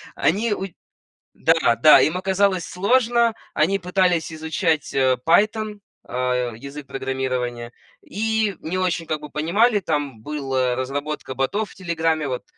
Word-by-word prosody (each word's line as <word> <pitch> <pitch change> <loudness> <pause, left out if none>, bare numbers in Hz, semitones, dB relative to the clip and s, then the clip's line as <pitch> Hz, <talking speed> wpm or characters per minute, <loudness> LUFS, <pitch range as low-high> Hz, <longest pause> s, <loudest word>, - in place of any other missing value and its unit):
Они 210 +5 +1
уч 195 -2 -5 0.6
Да, 160 -7 +3
да, 155 -1 +8
им 165 +4 +1
оказалось 190 -1 +1
сложно. 235 +4 +2 0.2
Они 195 +6 +2
пытались 180 -3 +1
изучать, 160 0 -1
э, 130 -1 +3
Python, 210 +4 +2 0.3
а, 125 -1 -1
язык 140 +4 -9
программирования 130 -3 -3 0.3
и 220 -1 -1
не 170 +4 -4
очень 180 -3 -1
как 155 -1 -3
бы 150 - -8
понимали. 205 - +2
Там 145 - -3
была 135 -2 -1
разработка 140 +2 -4
ботов 200 - -1
в - - -16
"Телеграме", 165 -4 -1
вот 125 -2 -4
160 Hz, 135 wpm, -22 LUFS, 135-195 Hz, 0.6 s, да